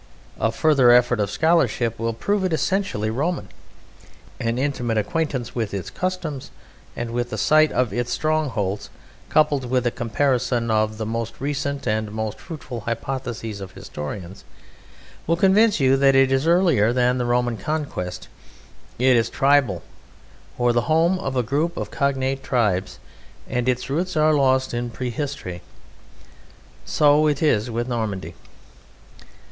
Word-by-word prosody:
A 115 - +1
further 140 -1 +4
effort 120 -1 +5
of 100 -2 0
scholarship 125 -5 +1
will 115 0 0
prove 200 - -1
it 185 -3 0
essentially 160 - 0
Roman. 160 +9 -2 0.9
An 115 +1 -1
intimate 125 -4 -1
acquaintance 135 +1 -2
with 110 -4 -2
its 95 - -5
customs 180 -7 -4 0.5
and 120 -1 -4
with 120 0 -2
the 110 - -4
site 155 +7 +4
of 125 -5 0
its 120 +2 -2
strongholds, 130 -11 -1 0.4
coupled 145 -5 +2
with 125 -1 +1
a 120 - +2
comparison 120 -1 0
of 110 0 +1
the 110 - -3
most 115 +1 -4
recent 140 0 -3
and 110 0 0
most 110 0 -4
fruitful 145 -7 -7
hypotheses 115 -2 -4
of 95 - -8
historians, 90 +6 -7 0.8
will 165 - +3
convince 195 +3 +4
you 135 -1 +4
that 135 0 +4
it 135 0 +4
is 135 +4 +1
earlier 165 - +4
than 125 0 +2
the 125 - 0
Roman 120 0 +1
conquest; 140 - -4 0.7
it 130 +1 +4
is 115 -1 +2
tribal, 135 -10 +2 0.7
or 120 0 +2
the 120 +5 0
home 170 +4 +3
of 135 -7 -3
a 125 - +2
group 145 +8 -1
of - - -4
cognate 135 -1 0
tribes, 100 -8 0 0.5
and 125 +1 -1
its 125 0 -1
roots 170 +5 -2
are 155 0 +4
lost 130 -3 +2
in 120 0 -2
prehistory. 125 - -5 1.2
So 150 +1 +4
it 145 0 0
is 115 -7 +2
with 120 +1 -2
Normandy. 105 -9 -3
125 Hz, 145 wpm, -22 LUFS, 115-145 Hz, 1.2 s, effort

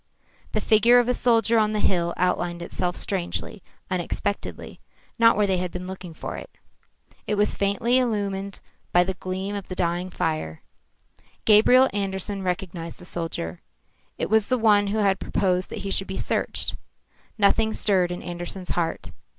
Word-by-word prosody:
The 215 - 0
figure 225 +4 +5
of 245 -1 +4
a 250 - +2
soldier 230 -2 +3
on 215 0 +2
the 210 - 0
hill 170 -4 +1
outlined 175 -1 0
itself 180 +1 -2
strangely, 195 +2 -3 0.3
unexpectedly, 185 +3 -3 0.4
not 230 -2 +6
where 210 - +3
they 190 -2 +1
had 180 0 -2
been 180 +1 -6
looking 180 -3 -8
for - - -6
it. - - -9 0.8
It 210 - +1
was 210 0 +1
faintly 230 +6 +2
illumined 200 -5 -2 0.3
by 175 - +5
the 190 +1 -2
gleam 185 +2 -4
from 200 -1 -4
the 185 - -6
dying 175 +1 -1
fire. 155 - -3 0.8
Gabriel 235 +5 +6
Andersen 195 0 -3
recognised 180 -2 -4
the 180 - -11
soldier. 165 - -3 0.6
It - - -3
was 220 -2 +3
the 255 - +3
one 210 -3 +4
who 205 +2 -1
had 195 -3 +2
proposed 185 -2 0
that - - -6
he 195 - -3
should 195 - 0
be 190 - -5
searched. - - 0 0.6
Nothing 220 +1 +3
stirred 185 -5 +2
in 175 - -5
Andersen's 175 +1 -6
heart. 165 - -2
195 Hz, 165 wpm, -24 LUFS, 180-210 Hz, 0.8 s, not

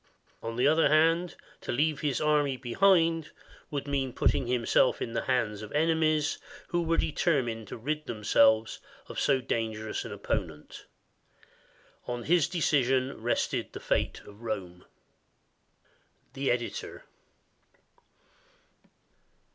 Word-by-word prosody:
On 115 0 -5
the 125 +2 +1
other 155 0 +4
hand, 165 +3 +3 0.3
to - - -4
leave 150 +4 +1
his 145 -4 -1
army 150 -3 +2
behind 165 +4 +2 0.4
would 145 -1 -4
mean 135 -3 -1
putting 125 - +1
himself 125 +1 +2
in 115 - -4
the - - -2
hands 115 -5 0
of 105 - -8
enemies 155 -1 +1 0.3
who 175 -1 0
were 165 0 +1
determined 125 - 0
to - - -7
rid 150 +6 -3
them 110 -3 -6
selves 110 +1 +4 0.3
of - - -6
so 135 -2 +2
dangerous 110 -2 -3
an - - -8
opponent. 75 -1 -5 1.2
On 120 -1 -3
his 170 +1 +3
decision 135 -7 +1
rested 120 +2 -1
the - - -6
fate - - -1
of 105 +2 -15
Rome. 95 -6 -5 1.5
The 135 +1 -1
Editor. 120 -1 -3
135 Hz, 125 wpm, -29 LUFS, 115-155 Hz, 1.5 s, other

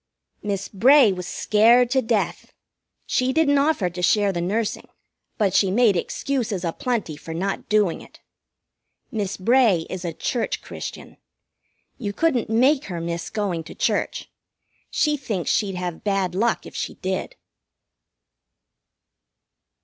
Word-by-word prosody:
Miss 200 -1 -3
Bray 250 +3 +5
was 180 -1 -5
scared 230 +6 +4
to 265 -1 +3
death. 225 -3 -2 0.5
She 255 +1 +1
didn't 285 -1 +3
offer 280 - +2
to 180 +1 -5
share 205 +2 +3
the 175 -2 -3
nursing, 210 +5 -2 0.5
but 200 -4 +1
she 195 - +3
made 215 0 +4
excuses 215 -1 -2
a 165 - -1
plenty 230 -11 -2
for 160 +2 -8
not 195 +3 -3
doing 210 -5 +2
it. - - -16 0.9
Miss 205 -3 -3
Bray 215 -5 +3
is 185 -1 -5
a 170 - -2
church 225 +8 -2
Christian. - - -8 0.8
You 205 -4 -3
couldn't 260 -3 +1
make 260 +6 +3
her 175 -3 -5
miss 170 0 -4
going 195 -6 -2
to - - -10
church. - - -1 0.6
She 300 -1 +1
thinks 215 - -2
she'd 195 -3 0
have 180 -2 -5
bad 195 -3 0
luck 225 +5 0
if - - -11
she - - -4
did. 190 0 -4
205 Hz, 140 wpm, -23 LUFS, 180-245 Hz, 0.9 s, Bray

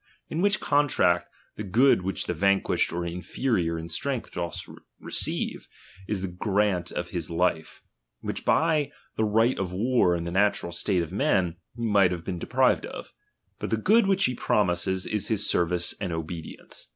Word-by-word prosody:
In 160 - -2
"Vvliich 200 0 +3
contract, 130 -12 +2 0.3
the 105 - -4
good 115 +5 +4
which 95 +1 -3
the - - -1
vanquished 100 +3 +2
or 85 +1 -3
^iiferior 85 0 -1
in 80 - -6
strength 125 +9 -2
doth 85 -1 -4 0.3
receive, - - -2 0.4
is 100 -3 -2
the - - -1
grant 95 0 0
of 85 0 -4
his 85 -3 -4
life, 85 -1 -1 0.4
which - - -4
hy 155 -3 +2 0.2
the 110 - 0
right 110 +4 +2
of 95 -2 -2
war 100 -2 +2
in 85 - -3
the 85 - -4
natural 100 -2 +1
state 90 +1 0
<^f 80 - -7
men 90 -3 +1 0.2
he 120 -1 -3
might 100 -4 +4
have 85 -2 -5
been 90 -3 -3
deprived - - +2
of; - - -9 0.5
hut - - -4
the 110 - +1
^ood 215 - +4
which 195 0 +3
he 125 - +1
promises, 95 -4 0
is 105 -2 0
his 105 -3 +1
service 85 0 +1
and 95 -4 -2
obe 80 0 -4
*lience. - - -9
95 Hz, 175 wpm, -26 LUFS, 85-110 Hz, 0.5 s, good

